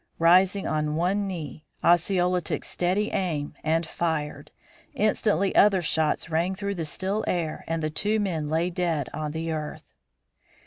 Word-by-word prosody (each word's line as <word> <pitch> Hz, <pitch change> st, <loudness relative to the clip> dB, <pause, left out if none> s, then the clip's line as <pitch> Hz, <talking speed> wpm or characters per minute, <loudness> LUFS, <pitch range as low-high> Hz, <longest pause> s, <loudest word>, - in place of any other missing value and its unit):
Rising 185 Hz, +4 st, +4 dB
on 150 Hz, -1 st, -1 dB
one 190 Hz, +5 st, +1 dB
knee, 160 Hz, -4 st, -6 dB, 0.2 s
Osceola 180 Hz, +1 st, +3 dB
took -, -, -3 dB
steady 190 Hz, +4 st, 0 dB
aim 155 Hz, -6 st, -2 dB
and 165 Hz, +2 st, +1 dB
fired. 150 Hz, -3 st, -3 dB, 0.5 s
Instantly 210 Hz, -, +1 dB
other 195 Hz, -3 st, +5 dB
shots 160 Hz, -1 st, +1 dB
rang 165 Hz, +4 st, 0 dB
through 200 Hz, 0 st, -3 dB
the 170 Hz, -4 st, -3 dB
still 190 Hz, +7 st, -2 dB
air 165 Hz, -3 st, -2 dB
and 165 Hz, -1 st, -2 dB
the 155 Hz, -, -1 dB
two 210 Hz, +7 st, +1 dB
men 165 Hz, -7 st, -1 dB
lay 165 Hz, +3 st, 0 dB
dead 170 Hz, -6 st, -1 dB
on 155 Hz, 0 st, -3 dB
the 160 Hz, +1 st, -3 dB
earth. 155 Hz, -1 st, -5 dB
170 Hz, 150 wpm, -26 LUFS, 155-190 Hz, 0.5 s, other